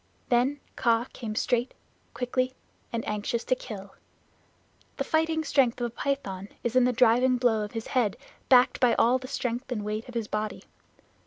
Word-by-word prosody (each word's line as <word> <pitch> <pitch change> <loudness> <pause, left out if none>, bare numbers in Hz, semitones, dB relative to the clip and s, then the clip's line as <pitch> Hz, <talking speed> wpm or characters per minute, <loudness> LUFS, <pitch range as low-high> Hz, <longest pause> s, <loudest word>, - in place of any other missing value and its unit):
Then 255 +4 +2 0.2
Kaa 230 0 +2
came 215 -3 -5
straight, 245 +2 0 0.4
quickly, 255 +1 -1 0.4
and 230 -1 -3
anxious 210 +3 -2
to - - +1
kill. 200 -6 -7 1.0
The - - 0
fighting 320 0 +1
strength 265 -5 +2
of 240 - 0
a - - -2
python 205 -9 -3
is 235 0 -2
in 255 -1 +6
the 250 - +3
driving 250 +1 +4
blow 235 -3 +2
of 210 - -7
his 225 -1 -4
head 235 -7 0 0.3
backed 250 -1 +5
by 245 -2 +4
all 250 +3 +4
the 255 - -8
strength 245 +1 -3
and 210 -4 -2
weight 215 +3 -4
of 245 - -11
his 230 -2 -2
body. 210 0 -3
240 Hz, 175 wpm, -27 LUFS, 225-255 Hz, 1.0 s, in